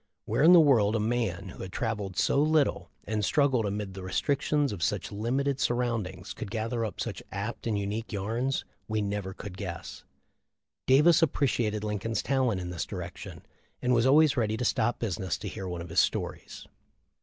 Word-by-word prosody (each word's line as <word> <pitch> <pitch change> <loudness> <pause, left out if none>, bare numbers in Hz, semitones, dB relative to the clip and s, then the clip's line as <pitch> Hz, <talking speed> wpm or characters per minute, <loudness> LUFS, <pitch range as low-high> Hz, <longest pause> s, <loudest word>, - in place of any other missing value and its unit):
Where - - 0
in 160 +4 +8
the 180 - +9
world 115 -9 +4
a - - +1
man 105 -4 -1
who - - -10
had 95 - -6
travelled 105 -4 -3
so 140 - +3
little 155 -1 +2
and 105 0 -2
struggled 130 0 +2
amid 100 -1 -3
the 95 - -7
restric 135 +9 0
tions 145 -4 +1
of 95 - -7
such - - -1
limited 130 +6 -1
surroundings 115 -7 -1
could 105 - -7
gather 115 +2 -2
up 110 - -4
such - - -4
apt 105 +5 -4
and 110 -2 0
unique 105 +3 -3
yarns 115 +6 -1 0.2
we 110 -1 0
never 100 -1 -3
could 100 -3 -8
guess. 85 -4 -6 0.8
Davis 150 +5 +6
appreciated 120 -8 +1
Lincoln's 105 +1 -2
talent 130 -7 +1
in 90 -1 -5
this 85 -3 -3
direction, - - -7 0.3
and 125 0 +1
was 120 +1 +3
always 150 +2 +5
ready 110 -3 0
to 125 - -2
stop 120 +1 +1
business 95 -5 -2
to - - -7
hear 95 - -5
one 90 -1 -4
of 85 - -10
his 85 - +2
stories. - - -2
110 Hz, 185 wpm, -28 LUFS, 100-130 Hz, 0.8 s, the